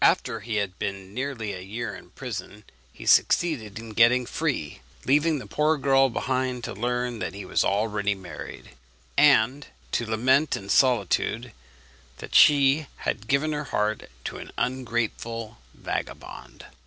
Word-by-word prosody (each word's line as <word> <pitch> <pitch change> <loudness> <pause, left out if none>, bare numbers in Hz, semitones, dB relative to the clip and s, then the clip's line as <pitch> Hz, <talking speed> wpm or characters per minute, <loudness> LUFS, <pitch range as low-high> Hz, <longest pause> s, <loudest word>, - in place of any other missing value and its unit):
After 115 - +3
he 110 +1 -4
had 100 -3 -2
been 100 -2 -4
nearly 125 -5 -3
a 90 - -6
year 110 +6 -5
in - - -13
prison 105 +1 -7 0.3
he - - -12
succeeded 120 -13 +3
in 115 0 -8
getting 120 +3 +4
free, 125 - -3 0.2
leaving 150 +3 +3
the 130 - -7
poor 155 +1 +1
girl 135 -1 +4
behind 130 0 -2
to - - -4
learn 120 +2 -2
that 90 0 -4
he 100 -1 -7
was - - +1
already 105 0 0
married, 90 -5 -9 0.4
and 140 -1 +4 0.2
to 120 - -1
lament 130 +7 +2
in 100 - -10
solitude 120 -1 +2 0.7
that - - -9
she 140 +1 +6 0.2
had 110 +1 -2
given 140 +4 +2
her 150 0 -3
heart 105 -4 -1
to - - -5
an - - -9
ungrateful 115 - -2 0.2
vagabond. - - -6
120 Hz, 145 wpm, -26 LUFS, 105-135 Hz, 0.7 s, she